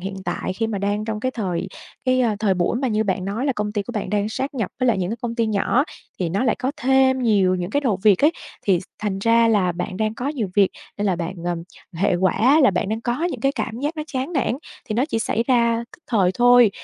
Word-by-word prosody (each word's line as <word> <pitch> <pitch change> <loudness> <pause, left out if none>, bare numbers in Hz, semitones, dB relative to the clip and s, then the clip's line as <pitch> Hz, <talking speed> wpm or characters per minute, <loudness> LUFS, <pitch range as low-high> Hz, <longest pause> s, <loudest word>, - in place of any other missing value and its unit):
hiện 195 +2 -5
tại - - -2
khi 225 +4 -1
mà 210 -3 -3
đang 205 +2 -1
trong 220 -1 -3
cái 255 +3 0
thời 190 -6 -3 0.4
cái, 255 0 +3
à, 225 -4 +1
thời 200 -3 +2
buổi 180 +5 0
mà 260 +1 0
như 220 -1 +1
bạn 185 -1 -1
nói 220 +8 -2
là 270 - +2
công 210 -2 -3
ty 205 - -1
của 240 - -8
bạn 210 -4 -3
đang 210 0 0
sáp 270 +5 -3
nhập 225 -7 -2
với 255 - +2
lại 230 -5 +3
những 180 +1 -1
cái 230 - -2
công 235 -1 -2
ty 230 -2 +1
nhỏ, 220 +6 +2 0.3
thì 175 -3 -1
nó 200 +8 0
lại 235 - +2
có 260 +3 -1
thêm 265 -1 +3
nhiều 195 -5 +3
những 180 0 -3
cái 285 - +1
đầu 220 -9 0
việc 210 +5 +5
ấy, 315 - +5 0.3
thì 185 -4 +2
s - - -11
thành 200 -2 -2
ra 230 +2 +4
là 190 -5 +2
bạn 180 +1 -4
đang 215 0 -1
có 250 +5 -3
nhiều 245 -10 -2
việc 200 -2 +4 0.3
nên 205 - 0
là 185 -3 +1
bạn, 175 +2 -4
ờ 175 0 0 0.4
hệ 185 +3 +1
quả 225 - +3
là 265 - +6
bạn 190 +2 -1
đang 220 +1 -2
có 245 +7 -1
những 275 -10 -2
cái 275 +2 +2
cảm 240 -2 -4
giác 300 +3 -2
nó 305 - -2
chán 265 +3 -3
nản, 275 -6 +1 0.4
thì 215 - -2
nó 245 +5 +2
chỉ 225 - -1
xảy 225 0 0
ra 235 -2 +2
tức 340 - -36
thời 195 -6 +2
thôi. 245 -2 +6
220 Hz, 275 wpm, -22 LUFS, 195-255 Hz, 0.4 s, là